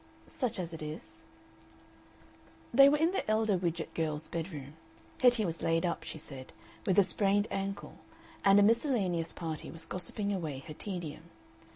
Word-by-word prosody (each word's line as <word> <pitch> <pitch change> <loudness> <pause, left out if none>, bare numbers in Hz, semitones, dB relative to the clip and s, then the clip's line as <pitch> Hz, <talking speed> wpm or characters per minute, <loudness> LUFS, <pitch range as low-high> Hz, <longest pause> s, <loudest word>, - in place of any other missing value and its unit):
"Such 255 -8 -2
as 175 -2 -4
it 165 - -7
is." 155 +1 -8 1.5
They 275 0 +9
were 295 - +3
in 325 +3 +3
the 385 - -2
elder 215 -1 +3
Widgett 170 -2 -2
girl's 155 -1 -2
bedroom; 155 -5 -5 0.5
Hetty 245 -4 +5
was 165 -2 -3
laid 165 +1 +2
up, 170 - -1
she - - -6
said, 135 -4 -10 0.3
with 190 - +3
a 200 - +8
sprained 205 +2 +2
ankle, 195 +1 -4 0.4
and 195 0 +7
a - - +6
miscellaneous 205 - +2
party 160 -3 -5
was 165 0 -4
gossiping 200 +4 -2
away 155 -8 -4
her 155 - -7
tedium. 170 -3 -6
180 Hz, 160 wpm, -32 LUFS, 160-205 Hz, 1.5 s, They